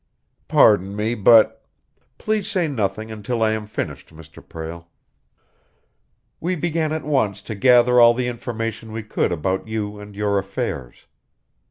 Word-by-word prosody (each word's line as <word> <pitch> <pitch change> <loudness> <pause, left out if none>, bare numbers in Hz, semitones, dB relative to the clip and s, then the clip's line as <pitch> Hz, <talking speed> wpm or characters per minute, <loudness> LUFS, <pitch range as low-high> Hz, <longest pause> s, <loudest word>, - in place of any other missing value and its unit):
"Pardon 100 -1 +4
me, 110 +2 -1
but 115 0 +5 0.3
" 125 +2 -44
"Please 215 -2 -2
say 180 -4 0
nothing 110 -4 -3
until 110 +2 -2
I 110 - +2
am 110 -1 -3
finished, 105 - -5
Mr. 80 0 -14
Prale. 85 +1 -8 1.5
We 180 +3 -1
began 160 -1 -1
at 155 -1 -3
once 130 -10 0
to 110 - -6
gather 125 +2 +5
all 120 0 +7
the 125 0 -1
information 115 -2 -5
we 110 0 -5
could 105 - -1
about 95 +5 -2
you 105 -2 -4
and 105 0 -11
your 100 -1 0
affairs. 95 -10 -5
110 Hz, 150 wpm, -21 LUFS, 100-125 Hz, 1.5 s, all